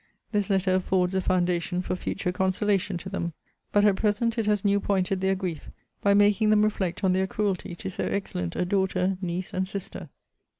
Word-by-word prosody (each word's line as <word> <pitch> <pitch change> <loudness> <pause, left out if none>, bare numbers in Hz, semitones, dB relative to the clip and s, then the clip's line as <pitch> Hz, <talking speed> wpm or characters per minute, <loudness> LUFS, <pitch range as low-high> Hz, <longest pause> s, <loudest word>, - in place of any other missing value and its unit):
This 205 -2 0
letter 190 -1 +2
affords 185 0 +1
a 190 - +1
foundation 180 0 0
for 185 - -2
future 180 0 -2
consolation 190 0 0
to 175 - -8
them; 170 -3 -3 0.4
but 205 0 +4
at 200 -2 +4
present 225 +2 +1
it 220 - -1
has 210 -1 +1
new 200 0 +4
pointed 190 -1 0
their 190 0 +2
grief, 180 -5 -5 0.3
by 200 0 +4
making 205 +1 +4
them 210 0 +5
reflect 195 -3 -1
on 185 -1 +3
their 190 +1 +1
cruelty 190 -4 -2
to 190 - -6
so - - -3
excellent 90 - -3
a 180 - 0
daughter, 190 0 0
niece, 180 0 -3
and 185 0 -1
sister. 195 0 -6
190 Hz, 195 wpm, -26 LUFS, 180-205 Hz, 0.4 s, them